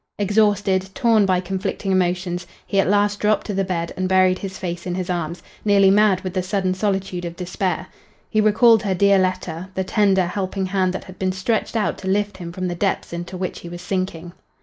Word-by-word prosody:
Exhausted, 205 -2 +2
torn 225 -4 +3
by 185 -1 +3
conflicting 190 +2 -3
emotions, 180 -1 0 0.2
he 195 - 0
at - - +3
last 205 0 +2
dropped 210 0 +1
to 210 - -3
the 195 0 +1
bed 170 -3 -3
and 185 0 -2
buried 185 -1 +4
his 190 -1 -6
face 175 -1 -5
in 175 - -2
his 185 -1 -2
arms, 170 -1 -3 0.2
nearly 200 -2 +5
mad 205 -2 +4
with 185 -1 -5
the 185 - 0
sudden 185 0 -1
solitude 190 -2 -2
of 170 -1 -5
despair. 180 -1 -2 0.4
He 215 - +1
recalled 220 +1 +5
her 195 -3 -1
dear 200 +1 +4
letter 185 -1 -2
the 190 - 0
tender, 190 -2 +2
helping 190 +1 -2
hand 185 -1 +1
that - - -5
had 185 - -13
been 185 -1 0
stretched 200 +5 -1
out 220 - 0
to 190 - -7
lift 205 0 0
him 170 -2 -7
from 185 +1 -3
the 175 - -2
depths 190 0 -1
into 175 +2 -5
which 185 0 -4
he 170 - -9
was 175 +1 -8
sinking. 180 -2 -3
190 Hz, 215 wpm, -21 LUFS, 180-200 Hz, 0.4 s, nearly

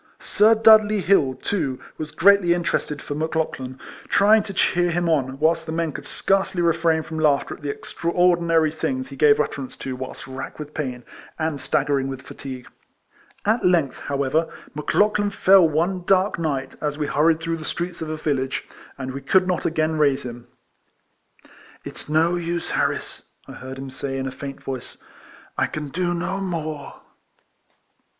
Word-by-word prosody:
Sir 215 +2 +4
Dudley 215 -2 +6
Hill, 155 -8 +3
too, 135 -3 -2 0.2
was 155 0 -4
greatly 180 +1 +4
interested 150 -4 -2
for - - -4
Mc 155 +2 -3
Lauchlan, 130 -5 -3 0.3
trying 215 +2 +5
to 205 - -7
cheer 175 -2 +2
him 175 0 0
on, 135 -5 0
whilst 160 +2 +1
the - - -3
men 165 -1 -1
could - - -8
scarcely 195 -1 0
refrain 165 -1 +2
from 160 0 -6
laughter 150 -3 +2
at - - -12
the 145 - -4
extra 165 +3 -4
ordinary 170 -3 +3
things 130 -4 -3
he 140 - -9
gave 145 +1 +5
utterance 140 -3 -3
to 130 -1 -5
whilst 130 0 -7
racked 130 0 -7
with 150 0 -8
pain, 125 -5 -4 0.3
and 155 -3 -2
staggering 135 0 +1
with 135 -1 -6
fatigue. 130 -2 -8 0.8
At 220 +3 +2
length, 170 -7 +2
however, 140 +3 -1 0.2
Mc 150 0 -7
Lauchlan 210 0 +3
fell 195 -3 +5
one 175 +4 0
dark 190 0 +2
night, 140 -5 -2
as 150 -1 -2
we 150 - -1
hurried 160 +2 +2
through 165 0 -2
the 155 - -8
streets 170 +2 -4
of 160 - -4
a 155 - -3
village, 135 -4 -2 0.3
and 130 -1 -5
we 140 - -6
could 185 +7 +3
not 180 -1 0
again 155 -1 0
raise 140 -3 +2
him. 120 -1 -8 0.7
" - - -25
It's - - -8
no 165 +3 +3
use, 170 0 -3
Harris," - - -2 0.2
I - - -9
heard 130 +1 -8
him 135 0 -7
say, 135 +1 -4
in 135 - -3
a 135 - -3
faint 135 +1 -8
voice, 130 -2 -6 0.3
" - - -23
I - - +2
can 150 -2 -5
do 175 +3 -1
no 190 +3 -2
more." 155 -6 -5
155 Hz, 180 wpm, -23 LUFS, 140-175 Hz, 0.8 s, Dudley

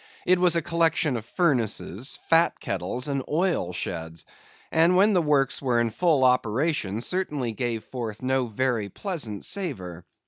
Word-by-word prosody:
It 180 0 +4
was 180 -1 +4
a 165 - +1
collection 165 -4 +1
of 115 -2 -5
furnaces, 125 - 0
fat 165 +1 +3
kettles, 125 +3 -3
and 140 -2 -1
oil 165 - 0
sheds; 80 -2 -5 0.5
and 165 +3 +4
when 205 +3 +5
the 180 - +4
works 145 -4 +1
were 125 -3 +1
in 120 -1 +1
full 155 0 +2
operation 125 - +1
certainly 150 -7 -2
gave 115 -1 -3
forth 115 -3 -6
no 130 -1 +1
very 115 -2 -1
pleasant 130 - -4
savor. 95 - -3
130 Hz, 150 wpm, -25 LUFS, 110-165 Hz, 0.5 s, when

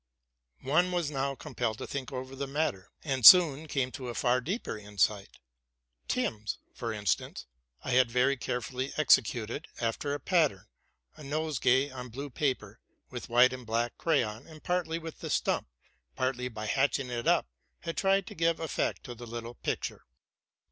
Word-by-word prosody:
One 175 +7 +2
was 175 -4 -1
now 135 -1 -1
compelled 115 -4 -3
to - - -5
think 135 -2 -5
over 130 0 -6
the 140 +1 -4
matter, 135 -10 -2
and 135 -4 -2
soon 160 -1 +9
came 135 -3 -1
to 130 -2 -7
a 120 - -5
far 125 0 +2
deeper 185 - -3
insight. 105 -1 -1 0.7
Thus, 110 0 -1 0.2
for 115 -2 -4
instance, 105 -2 -2 0.4
I - - -3
had 125 -1 +4
very 125 +3 +3
carefully 125 +1 -3
executed, 125 -2 +2
after 120 +5 -1
a - - -5
pattern, 155 - +1 0.5
a - - -11
nosegay 140 -2 +1
on 125 -1 -7
blue 140 +4 -7
paper, 125 -6 -2 0.3
with 125 -2 -7
white 125 +2 +5
and 130 -1 -7
black 115 +1 -1
crayon, 115 -8 0
and 155 -2 -13
partly 175 -2 -1
with 165 -1 -8
the - - -6
stump, - - 0 0.5
partly 130 -1 -1
by 110 -3 -6
hatching 135 +2 +1
it 120 -1 -3
up, - - +4 0.4
had 165 -1 -4
tried 195 0 +2
to - - -9
give 165 0 +1
effect 160 -3 -2
to 125 - -7
the 120 0 -10
little 115 +1 -6
picture. - - -4
130 Hz, 165 wpm, -30 LUFS, 120-150 Hz, 0.7 s, soon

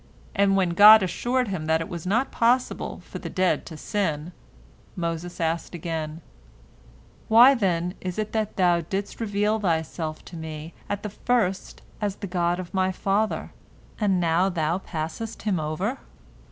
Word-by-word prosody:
and 195 0 +3
when 185 -3 +2
God 210 +4 +9
assured 245 +6 0
him 165 -5 -3
that 160 0 +3
it 165 - -4
was 170 0 -6
not 230 +8 +1
possible 245 +2 0
for - - -8
the - - -6
dead 185 -1 0
to 160 - -8
sin, 165 -4 -2 0.6
Moses 170 0 -4
asked 165 +1 -2
again, 160 -1 -4 1.1
"Why, 240 +5 +8
then, 180 -7 0
is 185 -1 -4
it 215 -1 -2
that 215 -2 -2
Thou 175 -2 +3
didst 195 +5 -4
reveal 210 0 +1
Thyself 160 -3 -2
to 175 - -10
me 160 0 -7 0.2
at 205 0 -3
the 210 - -4
first 205 -4 -1 0.2
as 205 -2 -1
the 205 - -6
God 175 -1 0
of 180 -2 -7
my 190 -1 +1
father, 200 +3 -1 0.5
and 195 -4 +2
now 170 +2 +2
Thou 170 0 0
passest 180 +6 -5
him 200 -5 0
over?" 170 - -2
185 Hz, 160 wpm, -25 LUFS, 165-210 Hz, 1.1 s, God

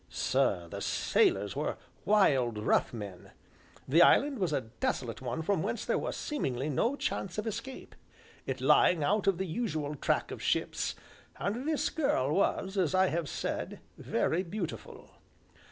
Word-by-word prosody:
Sir, - - 0
the - - -7
sailors 390 -5 +1
were - - -2 0.3
wild, 135 - +3
rough 105 - +2
men; 100 -6 -8 0.6
the 160 +6 +5
island 275 +8 +5
was 185 -5 0
a 140 - +1
desolate 115 0 -3
one 130 +5 -3
from 195 -1 +1
whence 230 +6 -2
there - - +1
was - - -3
seemingly 140 - -2
no 230 - +1
chance 195 -9 -3
of 215 - -2
escape, 255 +4 -6 0.5
it 130 0 -2
lying 150 +3 +4
out 205 +6 +1
of 195 -3 +3
the 190 - -2
usual 160 -6 -2
track 145 - 0
of - - -6
ships, - - 0 0.4
and 230 +9 -2
this 310 - 0
girl 155 - +1
was, 190 +1 0
as 185 0 +1
I 190 0 +4
have 165 -3 -2
said, - - -4 0.2
very 170 - 0
beautiful. 185 -1 -6
175 Hz, 155 wpm, -31 LUFS, 135-215 Hz, 0.6 s, the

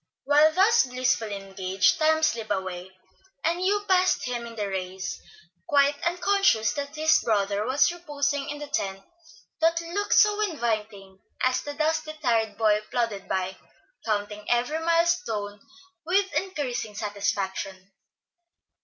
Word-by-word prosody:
While 295 +3 +5
thus 410 +8 +4
blissfully 250 -4 0
engaged, 190 -1 0
time 315 0 +3
slipped 230 -8 0
away, 190 -2 -3 0.5
and 340 +2 +1
Hugh 410 +2 +1
passed 370 -1 +3
him 240 -1 -4
in 230 - -10
the 210 -2 -2
race, 185 -1 -5 0.5
quite 285 0 +3
unconscious 355 - +2
that 285 0 -5
his 315 +1 +4
brother 205 -1 0
was 275 +6 +3
reposing 290 -5 -2
in 295 - -4
the 295 - -6
tent 195 -8 -3 0.6
that 330 +1 +3
looked 350 +5 -1
so 420 0 +5
inviting 215 - -3 0.2
as 255 0 +2
the 290 0 -7
dusty, 310 0 -1
tired 230 -8 0
boy 215 -2 +3
plodded 230 -5 -2
by, 190 0 -2 0.5
counting 210 -1 -2
every 245 +6 +1
mile 335 +1 +3
stone 215 - -2 0.4
with 385 +4 +1
increasing 270 - -3
satisfaction. 195 -2 -3
250 Hz, 135 wpm, -26 LUFS, 205-320 Hz, 0.6 s, While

